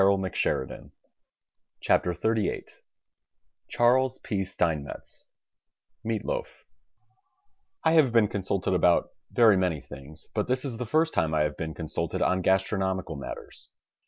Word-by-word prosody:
THE 95 -1 +3
STAG 65 - 0
COOK - - -11 1.1
BOOK 90 -1 -2
XXXVIII 110 +2 0 1.1
Charles 130 +2 +3
P, 100 -5 -1
Steinmetz 80 -6 -3 0.8
MEAT 110 -1 -2
LOAF - - -4 1.2
I - - +4
have 155 -6 +5
been 115 -2 +4
consulted 95 -1 -1
about 90 -1 +3 0.2
very 110 -5 +5
many 90 -5 0
things, 70 +3 -11
but - - -1
this 130 +2 -1
is 125 -5 -4
the 125 0 -4
first 160 +6 +2
time 80 -3 +1
I 75 - +3
have 75 0 -1
been 80 -1 -5
consulted 80 0 -2
on 95 0 +2
gastronomical 95 -2 0
matters. 70 -2 -8
95 Hz, 130 wpm, -27 LUFS, 85-115 Hz, 1.2 s, have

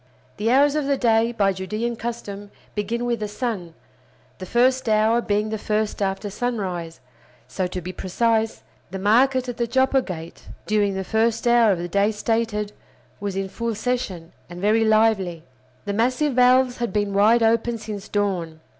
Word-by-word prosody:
The 215 +2 0
hours 280 +3 +4
of 300 -2 -1
the 280 -1 +1
day, 230 -1 +2
by 200 -4 +1
Judean 215 +6 -3
custom, 215 -3 -6 0.2
begin 230 +3 -2
with 240 -2 -1
the 210 - -3
sun, 205 -6 -4 0.6
the 185 - -7
first 255 +2 +2
hour 220 +2 +3
being 210 -1 0
the 220 0 -3
first 210 0 -1
after 195 +1 -2
sunrise; 190 -8 -3 0.5
so, 185 -2 -2
to 180 0 -5
be 180 +2 -6
precise; 220 +4 0 0.3
the 190 - -5
market 250 +6 +3
at 245 -1 -5
the 235 - 0
Joppa 265 +2 +2
Gate 170 -6 -8 0.2
during 205 -2 +1
the 190 - -2
first 225 +4 0
hour 235 -2 +5
of 190 - +1
the 175 +1 -4
day 200 +4 +2
stated 215 -1 -1 0.5
was 200 -2 -4
in 195 0 -2
full 230 +3 -3
session, 200 -8 -3 0.2
and 175 0 -8
very 215 +4 +3
lively. 215 -6 +2 0.4
The 200 - -2
massive 255 +6 +1
valves 250 0 +4
had 235 -4 -2
been 205 -1 -1
wide 220 +4 +4
open 230 +1 +2
since 215 -2 -7
dawn. 180 -6 -2
215 Hz, 170 wpm, -23 LUFS, 195-235 Hz, 0.6 s, hour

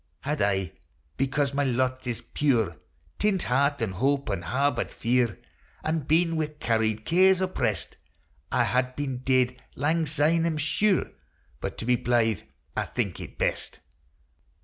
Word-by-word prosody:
Had 150 -3 -2
I, 95 -4 +1 0.4
because 135 +1 0
my 145 +1 +1
lot 130 0 0
is 120 -2 -2
puir, 115 - +1 0.4
Tint 205 -3 +2
heart 140 +1 +1
an' 105 - -1
hope, 135 +5 0
an' 95 - -2
harboured 130 - 0
fear, 120 -2 +1 0.5
An' 160 +1 0
been 165 +3 +2
wi' 155 -1 +1
carried 110 -1 0
cares 185 +2 +5
opprest, 120 - -1 0.5
I 125 - +3
had 125 +1 0
been 135 -3 -3
dead 130 -1 +1
langsyne, 155 +2 +2
I - - +2
'm 160 -2 -1
sure; 185 +6 +1 0.5
But - - -4
to - - -5
be 125 0 +3
blythe 115 -5 +1 0.3
I - - 0
think - - -3
it - - -9
best. - - -1
130 Hz, 150 wpm, -27 LUFS, 115-155 Hz, 0.5 s, cares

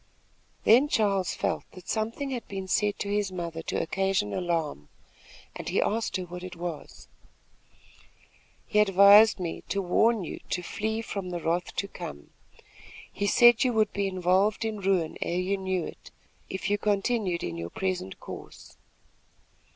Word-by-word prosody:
Then 250 +7 +6
Charles 200 -8 +1
felt - - -1
that 185 -1 -13
something 230 +6 -2
had 245 -3 -4
been 195 -1 -5
said 205 +2 +1
to 200 - -4
his 205 -1 0
mother 170 -3 -5
to - - -2
occasion 190 - 0
alarm, 165 - -2 0.7
and - - -5
he - - +1
asked 220 -1 0
her 185 - -4
what 180 0 -8
it 185 -1 -7
was. 170 -2 -7 1.6
"He 210 - +1
advised 205 +1 +7
me 170 -3 -4
to 200 - 0
warn 210 +3 +2
you - - -6
to 180 - -2
flee 220 +4 -3
from 200 -4 -5
the 175 -1 -3
wrath 170 +2 -2
to 200 - -2
come. 70 - -9 0.8
He 200 - -1
said 240 +2 +6
you 250 -2 +1
would 215 -2 +2
be 200 -1 0
involved 190 +4 +1
in 220 -2 -3
ruin 185 -4 0
ere 175 - -1
you 185 +2 0
knew 190 -3 -2
it, - - -10 0.4
if 190 +1 -4
you 205 0 +1
continued 205 -3 0
in 85 -1 -3
your 85 0 -5
present 185 - -3
course." - - -11
195 Hz, 160 wpm, -27 LUFS, 175-210 Hz, 1.6 s, advised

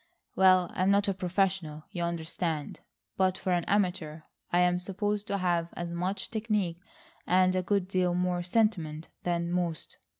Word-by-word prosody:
Well, 185 -2 +5
I'm 185 +1 +1
not 200 0 +3
a 195 - +2
professional, 180 -4 -1
you 175 - -4
understand, 165 -2 -3 0.4
but 185 -1 +2
for 185 - -2
an 175 -1 +1
amateur 180 -6 0 0.3
I 175 - +4
am 180 0 +3
supposed 205 +3 -2
to 200 - 0
have 175 -3 0
as 175 0 -4
much 185 +3 -3
technique 210 -6 -1 0.5
and 185 +1 +4
a 185 - +2
good 195 0 0
deal 185 -2 +1
more 180 0 0
sentiment 175 -6 0
than 170 -1 -1
most." 175 -3 -2
180 Hz, 160 wpm, -29 LUFS, 170-190 Hz, 0.5 s, Well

